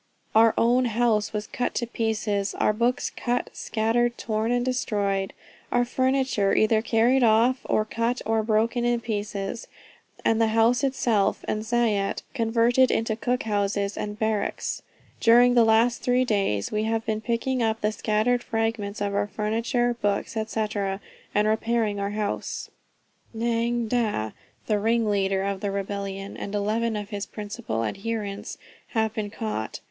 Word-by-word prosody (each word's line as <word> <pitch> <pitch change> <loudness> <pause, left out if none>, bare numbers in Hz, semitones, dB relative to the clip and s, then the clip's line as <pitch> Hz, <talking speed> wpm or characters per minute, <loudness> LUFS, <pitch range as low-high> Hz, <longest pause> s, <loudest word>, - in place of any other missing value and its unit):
Our 225 0 +5
own 245 +2 +3
house 225 -2 +1
was 210 -1 -3
cut 245 - -3
to 240 - 0
pieces, 215 -3 -1
our 215 - +2
books 235 +3 0
cut 245 0 -2
scattered, 235 +2 0
torn 220 +1 -1
and 245 0 +1
destroyed; 200 -6 -1 0.4
our 245 0 +3
furniture 260 -5 +1
either 220 0 +3
carried 235 +3 +3
off, 235 +3 +4
or 215 - +1
cut, 230 +3 -1
or 225 0 +2
broken 225 +2 +1
in 240 -1 +1
pieces, 205 0 -4 0.6
and 225 0 +3
the 225 - +4
house 235 +4 +4
itself 240 -7 +1
and 215 - -1
zayat 220 -4 0
converted 235 +1 +3
into 225 -1 0
cook 245 +2 -1
houses 200 -1 -1
and 210 0 -4
barracks. 220 -2 -1 0.4
During 245 +1 +6
the 240 -1 +6
last 225 +2 +3
three 250 +1 +2
days, 195 - 0
we 215 0 0
have 225 0 -1
been 215 0 -1
picking 240 +3 -1
up 225 -1 0
the 210 - +1
scattered 220 +3 +1
fragments 225 -3 -2
of 200 -1 -1
our 205 0 0
furniture, 230 +3 0
books, 205 +2 -1
&c. 220 0 -1 0.7
and 210 +1 +3
repairing 220 -1 0
our 200 0 -1
house. 210 0 -3 0.7
"Nga 235 0 0
Dah, 215 - 0 0.3
the 210 -2 +1
ringleader 205 -3 +1
of 200 -1 -2
the 205 - -1
rebellion, 195 0 -4
and 200 - -5
eleven 220 +2 0
of 205 -1 -5
his 205 -1 -4
principal 205 - -4
adherents, 205 - -4 0.4
have 220 -1 +1
been 215 -2 -3
caught. 215 - -4
220 Hz, 150 wpm, -25 LUFS, 205-235 Hz, 0.7 s, During